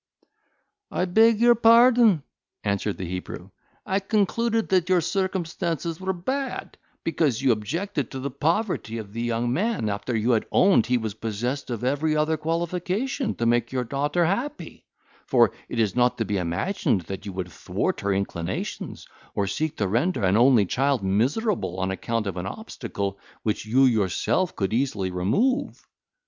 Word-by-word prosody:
"I 180 - 0
beg 220 +4 +4
your 240 +1 +6
pardon," 230 - +5 0.4
answered 100 0 -1
the 95 - -4
Hebrew, 90 +1 -6 0.3
"I 190 - +1
concluded 225 +3 0
that 185 -2 +2
your 185 -1 +5
circumstances 170 -2 -2
were 190 0 0
bad, 260 +10 -4 0.3
because 155 -7 +1
you 130 - +5
objected 145 - -2
to 135 - -6
the 140 +1 -4
poverty 160 - -1
of 105 -3 -8
the 115 - -3
young 120 0 0
man 205 - 0
after 105 +4 -3
you 110 +3 +1
had 110 -2 +1
owned 190 - +4
he 125 +1 +2
was 110 -3 -3
possessed 115 +6 -3
of 120 -1 -4
every 145 +4 +1
other 155 +1 +2
qualification 180 - -2
to 115 - -2
make 120 0 +2
your 130 -1 -1
daughter 145 +7 0
happy; 245 - -3 0.4
for - - +4 0.2
it 120 - -3
is 105 -4 +1
not 125 0 +2
to 115 - -1
be 105 -1 -1
imagined 90 - 0
that 95 +4 -7
you 100 - -5
would 90 -1 -5
thwart - - -2
her 100 - 0
inclinations, 95 -2 -3 0.3
or 100 - +1
seek 145 +11 -2
to 100 - 0
render 120 - 0
an 95 +1 +3
only 120 -2 +5
child 135 +3 0
miserable 105 - 0
on 95 0 -1
account 115 +3 -2
of 95 -3 -4
an 90 +1 -3
obstacle 100 - -5 0.2
which 110 0 -2
you 130 +5 +4
yourself 115 - +1
could 95 +1 -1
easily 110 -7 0
remove. 230 - 0
130 Hz, 165 wpm, -25 LUFS, -, 0.4 s, your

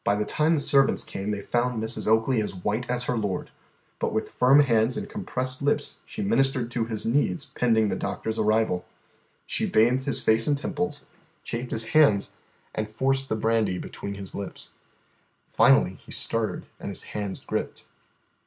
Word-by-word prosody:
By 100 - +2
the 105 0 -1
time 155 +2 +2
the - - +1
servants 140 -1 +3
came 100 +2 -5
they 105 -1 -2
found 120 +1 0
Mrs. 110 +1 -3
Oakley 110 +2 +3
as 105 - -4
white 105 +7 -2
as 125 0 0
her 125 - -1
lord. 105 -5 -2 0.5
But - - 0
with 110 - -2
firm 135 +3 +5
hands 115 -3 +2
and - - -4
compressed 130 +1 -3
lips 145 +1 0
she 210 - -5
ministered 135 - +1
to 120 -2 -1
his 110 -2 -4
needs 115 -6 +1
pending 110 -3 +2
the - - -1
doctor's 110 0 -3
arrival. 110 -4 +2 0.6
She - - -1
bathed 125 +4 +3
his 140 -5 +2
face 110 +1 +3
and 145 -1 +2
temples, 150 +2 -3 0.4
chafed 120 +1 -4
his 115 0 +1
hands, 110 -10 +4 0.4
and 110 0 -3
forced 135 +4 0
the - - +1
brandy 110 -4 +1
between 100 +2 -6
his 100 -2 -8
lips. 100 -2 -7 0.8
Finally - - +4
he - - -13
stirred 115 -1 -1
and - - -5
his - - -4
hands 100 -2 -4
gripped. - - -4
115 Hz, 175 wpm, -26 LUFS, 110-130 Hz, 0.8 s, firm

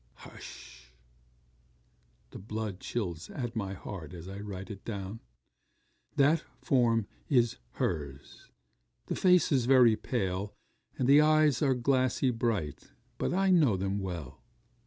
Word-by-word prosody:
Hush! 65 0 -12 1.4
the - - -9
blood 105 -1 -5
chills 90 -9 -4
at 120 -3 -5
my 100 -3 -3
heart 90 -4 -8
as 85 +1 -9
I 100 +1 -7
write 100 -2 -7
it 100 -1 -9
down 100 0 -5 1.0
that 150 +3 +3 0.2
form 115 -5 +2 0.2
is 120 -4 +3 0.2
her's; 70 -4 -4 0.6
the - - -3
face 180 -3 +4
is 130 -4 +3
very 125 -4 +6
pale, 100 -4 -3 0.4
and 125 - 0
the 140 +2 +7
eyes 155 -4 +4
are 135 -3 +3
glassy 130 +1 +1
bright; 110 - -2 0.3
but - - 0
I 190 +2 +2
know 145 - +4
them 95 +2 -1
well. 85 -9 -6
110 Hz, 130 wpm, -30 LUFS, 95-130 Hz, 1.4 s, the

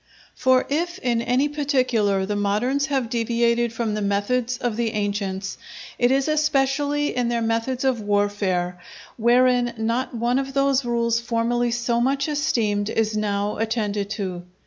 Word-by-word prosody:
For 260 0 +3
if 345 +5 -1
in 240 -9 0
any 250 +4 +1
particular 255 -9 +1
the 205 +1 -2
moderns 230 +8 0
have 270 -4 0
deviated 235 0 +1
from 225 -2 -2
the 210 - -2
methods 230 +5 0
of 240 -3 -2
the 230 0 -1
ancients, 200 -2 -3 0.4
it 245 - +4
is 270 +2 +2
especially 290 -1 +1
in 245 -1 0
their 235 0 0
methods 230 +3 -1
of 260 -4 +1
warfare, 205 -3 0 0.4
wherein 245 +1 +3
not 230 +3 -1
one 240 +3 +1
of 270 0 -5
those 275 -1 +2
rules 235 -1 +1
formerly 235 +1 0
so 235 0 0
much 275 +3 +1
esteemed 225 -9 0
is 220 -1 0
now 205 -1 -1
attended 210 -3 -1
to. 185 -4 -4
235 Hz, 150 wpm, -23 LUFS, 210-260 Hz, 0.4 s, it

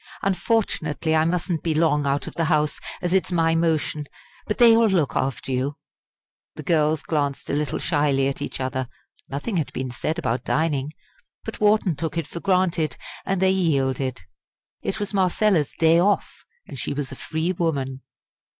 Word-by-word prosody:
Unfortunately 180 - 0
I 155 0 +3
mustn't 170 -1 -1
be 160 -2 -1
long 150 -3 +2
out 140 0 0
of - - -7
the 165 - 0
House, 150 -1 +1 0.2
as 175 0 0
it's 190 -2 +2
my 165 -2 +2
motion; 160 -2 0 0.4
but 210 - -1
they 235 -2 +7
will 230 0 +5
look 175 -9 +1
after 135 0 -1
you." 130 +3 -1 0.8
The 155 - -7
girls 155 0 +2
glanced 145 -3 -2
a - - -2
little 145 -2 -1
shyly 145 -4 +1
at 140 +1 -3
each 145 - -4
other. 130 -1 -2 0.4
Nothing 145 +9 -3
had 155 - -1
been 130 -1 -3
said 155 +7 -2
about 130 -7 -1
dining; 150 -3 0 0.5
but - - -7
Wharton 210 -5 +3
took 160 +3 -4
it 165 - -1
for 170 - -7
granted; 180 -6 +1 0.3
and 195 -1 0
they 190 - +5
yielded. 135 - 0 0.6
It 215 - -3
was 205 0 -3
Marcella's 185 -4 +2
"day 165 +1 +5
off," 200 +3 0 0.2
and - - -8
she - - -2
was 140 -2 -3
a - - -6
free 160 +6 -2
woman. 140 -7 -2
160 Hz, 175 wpm, -23 LUFS, 140-180 Hz, 0.8 s, they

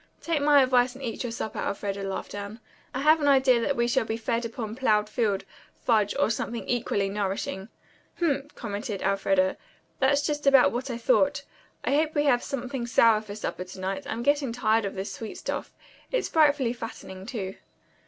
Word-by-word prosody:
"Take 330 -3 -1
my 285 -1 +6
advice 250 -1 +3
and 270 - -10
eat 235 -3 -4
your 245 - -3
supper, 220 -1 -4
Elfreda," 200 0 -3
laughed 195 -1 -4
Anne. 205 +2 -6 0.3
"I 260 - -3
have 310 +2 +5
an 290 - +2
idea 265 -3 +5
that 280 +4 0
we 235 0 +1
shall 245 +1 +2
be 220 0 -3
fed 230 0 -2
on 220 -2 -4
plowed 215 -5 +2
field, 210 -3 0 0.3
fudge 215 -4 +2
or - - +2
something 230 0 -3
equally 225 -5 0
nourishing." 195 0 -3 0.5
"Humph!" 290 -4 -1
commented 210 -1 -4
Elfreda. 195 -1 +2 0.4
"That's 280 +2 +3
just 295 -2 -2
about 270 -2 +6
what 255 +3 -3
I 240 - -3
thought. - - +2 0.4
I - - 0
hope 310 +2 +1
we 290 - +3
have 250 -4 +3
something 255 -2 -4
sour 225 -2 +5
for 205 -2 -8
supper 210 -3 -4
to 185 +1 -11
night. 190 +1 -3
I'm 230 +1 -3
getting 285 -2 +2
tired 225 -2 +1
of 195 0 -4
sweet 225 -6 -7
stuff. - - -4 0.4
It's - - 0
frightfully 290 -6 +3
fattening, 195 -5 -8
too." 195 -6 -5
235 Hz, 185 wpm, -27 LUFS, 205-270 Hz, 0.5 s, my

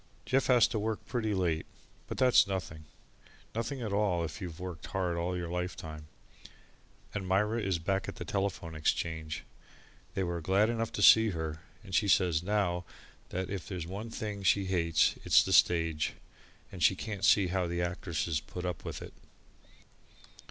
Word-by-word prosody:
Jeff 135 +1 +2
has 125 -4 +6
to 110 - -2
work 110 +1 -3
pretty 115 -4 -1
late, 90 -5 0 0.4
but - - -5
that's 130 -5 +5
nothing 80 -5 -4 0.7
nothing 120 +3 -3
at 105 -3 -3
all, 100 -5 +1
if - - -7
you've 85 -3 -6
worked 90 -4 -6
hard 90 0 -1
all 90 +2 -1
your 85 -1 -3
lifetime. 85 -3 -5 1.1
And 100 -3 -4
Myra 105 +5 +1
is 95 -4 0
back 95 +3 -1
at - - -6
the - - -6
Telephone 95 -4 -2
Exchange 80 -1 -2 0.7
they 95 - 0
were 85 -1 -2
glad 100 +7 +3
enough 115 -1 -2
to 105 - -1
get 110 -3 +7
her, 80 -1 -4 0.2
and 95 -3 -11
she 100 +4 +3
says 90 -4 +3
now 90 -2 0 0.5
that 95 +1 -3
if 95 -5 -4
there's 90 -4 -4
one 100 +6 -6
thing 105 -2 -5
she 100 +1 +3
hates, 85 -4 +2
it's - - +6
the - - -1
stage, 80 -3 +3 0.6
and 90 - -9
she 95 - +5
can't 100 0 -5
see 100 -2 +5
how 90 -1 0
the 85 +1 -1
actresses 85 -3 -2
put 90 +3 -7
up 90 -3 -3
with - - -6
it. - - -10
90 Hz, 175 wpm, -31 LUFS, 85-100 Hz, 1.1 s, get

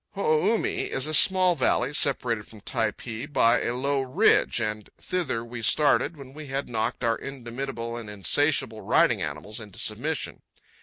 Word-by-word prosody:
Ho 200 - -3
o 155 +2 +2
u - - +2
mi - - -2
is 135 - -1
a 155 - -3
small 185 +2 +5
valley, 140 0 +1
separated 120 -7 +1
from 110 -2 -14
Typee 115 +2 -3
by 120 -4 +3
a 120 - -2
low 140 +2 0
ridge, 130 -1 +3
and 105 -1 -3
thither 160 -11 -2
we 120 0 -8
started 150 +7 +3
when 135 -2 -12
we 150 0 -9
had 135 +1 -3
knocked 115 +1 -2
our 115 -1 +2
indomitable 120 -2 -6
and 115 -3 -7
insatiable 110 +2 +1
riding 95 - +2
animals 75 - -5
into 105 -4 -12
submission. - - -2
125 Hz, 170 wpm, -26 LUFS, 110-145 Hz, -, small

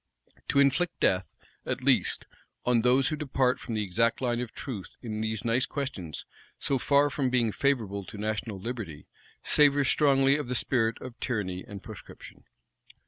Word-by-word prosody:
To - - 0
inflict 140 +5 +2
death, 95 0 +1 0.3
at - - -3
least, - - +2 0.4
on 120 -2 +3
those 130 +3 +4
who 155 - -1
depart 135 -4 +1
from 115 - -5
the 105 - 0
exact 115 +5 +1
line 120 -2 0
of 125 -2 -4
truth 115 -9 -7
in 110 -2 -4
these 110 0 -3
nice 120 +4 +2
questions, 110 - -5 0.3
so 135 - 0
far 145 +3 +3
from 135 -2 0
being 120 -3 +2
favorable 110 -7 0
to 105 - -9
national 105 0 -3
liberty, 95 -9 -6 0.4
savors 145 -2 +4
strongly 135 -1 +4
of 150 -4 -4
the 125 - -2
spirit 115 -1 +1
of 125 -2 -9
tyranny 95 -7 -2
and 100 -2 -10
proscription. 110 -4 -12
120 Hz, 165 wpm, -28 LUFS, 105-135 Hz, 0.4 s, those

